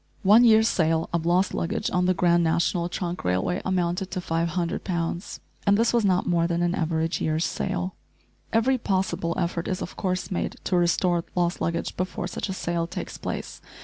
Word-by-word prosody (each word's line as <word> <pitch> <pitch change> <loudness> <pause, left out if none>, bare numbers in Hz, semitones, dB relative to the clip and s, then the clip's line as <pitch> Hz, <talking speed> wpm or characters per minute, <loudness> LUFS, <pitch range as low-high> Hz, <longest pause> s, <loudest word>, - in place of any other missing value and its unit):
One 210 +5 +7
year's 220 -1 +6
sale 160 -5 +1
of 170 -1 0
lost 180 +2 +2
luggage 185 +5 -2
on 180 0 +2
the 185 - +3
Grand 170 0 +3
National 170 +1 +1
Trunk 175 0 -4
Railway 90 - 0
amounted 180 0 -1
to 185 - -3
500 170 0 -1
pounds! 170 +1 -3 0.3
and 200 0 +5
this 230 +1 +2
was 235 -2 +3
not 185 -2 +2
more 170 -1 +2
than 170 0 0
an 175 0 +1
average 165 -2 -1
year's 160 +1 +1
sale. 185 -1 -2 0.6
Every 250 +4 +2
possible 185 -5 -1
effort 170 -2 -1
is 185 - -2
of - - -6
course 185 0 -2
made 180 - -2
to 185 - 0
restore 175 0 +2
lost 175 -1 0
luggage 170 0 -2
before 185 -1 -3
such 180 - -4
a - - -1
sale 170 -2 -2
takes - - -6
place. - - -5
175 Hz, 185 wpm, -25 LUFS, 170-185 Hz, 0.6 s, One